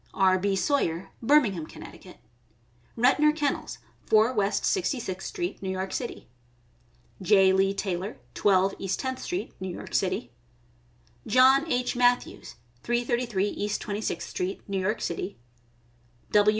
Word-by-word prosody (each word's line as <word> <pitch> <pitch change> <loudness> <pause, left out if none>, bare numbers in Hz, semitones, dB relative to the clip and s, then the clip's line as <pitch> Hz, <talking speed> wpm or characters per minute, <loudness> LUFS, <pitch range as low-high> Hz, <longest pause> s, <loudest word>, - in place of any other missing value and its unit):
R. 190 -1 +4
B. 195 +1 0
Sawyer, 190 - 0
Birmingham, 225 - +3
Conn.; - - -11 1.1
Retnor 295 +6 +4
Kennels, 290 -3 -2 0.3
4 220 +3 +4
West 205 -3 0
Sixty 355 -9 0
sixth 190 -4 -5
street, 355 -4 -4
New 190 - -4
York 190 0 -3
City; 240 - -5 0.9
J. 190 0 +5
Lee 195 +1 +2
Tailer, 190 +1 -3 0.2
12 195 -1 +3
East 190 -1 -2
Tenth 260 -1 -3
street, 360 +1 -4
New 190 0 -4
York 175 - -8
City; 180 -11 -1 1.0
John 265 +5 +5
H. 250 0 0
Matthews, 245 0 +1 0.3
333 240 -4 0
East 205 0 -2
Twenty 210 0 -4
sixth - - -3
street, 185 +2 -4
New 195 -1 -2
York 210 +4 -1
City; 180 +1 -4 0.9
W. 210 0 +5
205 Hz, 135 wpm, -27 LUFS, 190-250 Hz, 1.1 s, J